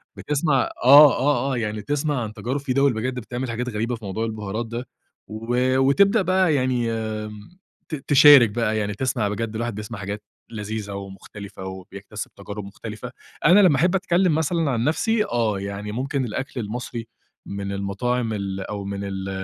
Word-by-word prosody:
بتسْمَع 145 -2 +1 0.2
آه، 140 +2 +8
آه، 135 -1 +1
آه، - - -1
يعني 105 -2 -2
تسْمَع 145 0 -1
عن 110 - -6
تجارب 130 +6 -3
في 135 -2 -2
دِوَل 140 -1 +3
بجد 125 +3 -3
بتعمل 125 +2 -5
حاجات 125 +2 -3
غريبة 115 +2 -2
في 110 -2 -11
موضوع 105 +4 -2
البهارات 110 0 -4
ده 115 +2 -6 0.4
و 120 +4 0
وتبدأ 195 - +4
بقى 185 -4 +2
يعني 125 -3 0
آمم، 110 - -5 0.3
ت 155 - -2
تِشارِك 140 -4 +7
بقى 110 0 -1
يعني 105 -1 -1
تسْمَع 120 -1 -1
بجد، 110 +1 -3
الواحد 115 -1 -3
بيسْمَع 105 0 -6
حاجات 100 +2 -5 0.3
لذيذة 105 -1 -5
ومختلفة 100 0 -9
وبيكتسب 95 +2 -8
تجارب 100 +1 -7
مختلفة. 110 +4 -8 0.3
أنا 180 +6 +7
لمّا 180 -7 +6
أحب 175 +7 +2
أتكلم 180 -3 +2
مثلًا 160 -1 0
عن 115 -2 0
نفسي 210 - +1
آه، 110 -4 0
يعني 100 +1 -5
ممكن 135 +3 -2
الأكل 130 +3 -4
المصري 115 +1 -5 0.4
من 100 0 -4
المطاعم 110 +4 -1
ال 100 -2 -3
أو 100 +1 -5
من 100 0 -4
ال 95 -1 -4
115 Hz, 170 wpm, -23 LUFS, 105-135 Hz, 0.4 s, آه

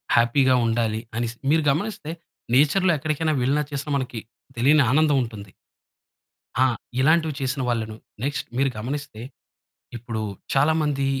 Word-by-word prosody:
హ్యాపీ‌గా 130 +2 +4
ఉండాలి. 115 -1 0 0.2
అనిసి 120 0 -2 0.2
మీరు 160 -1 +3
గమనిస్తే 160 -1 -3 0.4
నేచర్‌లో 175 +6 +4
ఎక్కడికైనా 155 +2 -1
వెళ్ళినా 140 +4 +2
చేసినా 145 +1 -3
మనకి 125 -4 -4 0.4
తెలియని 140 +4 +5
ఆనందం 150 -1 +4
ఉంటుంది. 105 -5 -9 1.1
ఆ! - - +6 0.4
ఇలాంటివి 160 +1 +3
చేసిన 135 +1 -1
వాళ్ళను 110 -2 -2 0.3
నెక్స్ట్ 140 0 -2
మీరు 135 0 +3
గమనిస్తే 130 -1 -5 0.8
ఇప్పుడు 115 -1 -5 0.3
చాలా 145 +4 +4
మంది 140 -2 0
135 Hz, 125 wpm, -24 LUFS, 120-150 Hz, 1.1 s, ఆ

